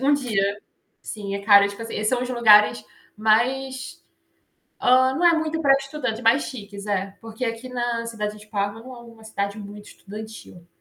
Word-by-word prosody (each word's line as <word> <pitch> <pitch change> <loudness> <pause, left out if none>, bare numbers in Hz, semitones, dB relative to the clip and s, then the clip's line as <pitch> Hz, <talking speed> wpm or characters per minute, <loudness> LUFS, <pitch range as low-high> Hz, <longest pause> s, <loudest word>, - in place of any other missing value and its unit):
um 280 +2 +3
dia. 205 -7 0 0.4
Sim, 200 -2 -6
é 200 - -4
caro, 200 -1 +6
tipo 200 +2 -10
assim, 225 -2 -5
são 245 +3 +1
uns 250 - -4
lugares 215 -4 +5 0.3
mais 255 +5 0 0.8
hã, 260 +1 +4
não 345 - -1
é 340 -1 +6
muito 320 0 -2
pra 275 - +5
estudante 275 -5 -4
mais 235 +5 +3
chiques, 205 -4 -8
é. 195 -1 -2
Porque 225 +2 -6
aqui 230 +2 -4
na 240 -2 -2
cidade 210 -2 -4
de 210 - -15
Parma, 205 +1 -3
não 255 +1 -11
é - - -11
uma 230 -1 -16
cidade 200 -1 -4
muito 205 0 -10
estudantil. 210 -4 -11
225 Hz, 180 wpm, -23 LUFS, 205-255 Hz, 0.8 s, caro